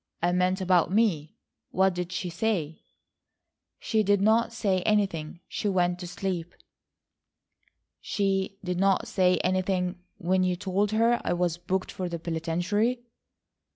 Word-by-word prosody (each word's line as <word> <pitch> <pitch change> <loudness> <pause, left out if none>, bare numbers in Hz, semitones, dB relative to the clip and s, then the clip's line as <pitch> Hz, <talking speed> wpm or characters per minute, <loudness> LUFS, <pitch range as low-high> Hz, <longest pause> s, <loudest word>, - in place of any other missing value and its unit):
I 175 - +3
meant 180 +1 +1
about 180 -2 +3
me. 185 -8 +1 0.3
What 190 +1 +2
did 180 0 -4
she 185 -1 -3
say?" 165 -5 -2 1.0
"She 220 - 0
did 205 -1 +3
not 220 +3 +3
say 200 -5 0
anything. 180 -5 0
She 205 - -2
went 180 -2 +1
to 180 - -6
sleep." 180 -1 -4 1.4
"She 195 -1 -1
did 180 -1 -2
not 195 0 +2
say 180 -2 +3
anything 185 0 0 0.2
when 185 +2 +1
you 180 -1 +1
told 195 +2 0
her 230 +3 +2
I - - 0
was 175 -1 -1
booked 185 +2 -2
for 185 -1 -4
the 170 - -3
penitentiary?" 175 +9 -1
185 Hz, 140 wpm, -27 LUFS, 175-200 Hz, 1.4 s, I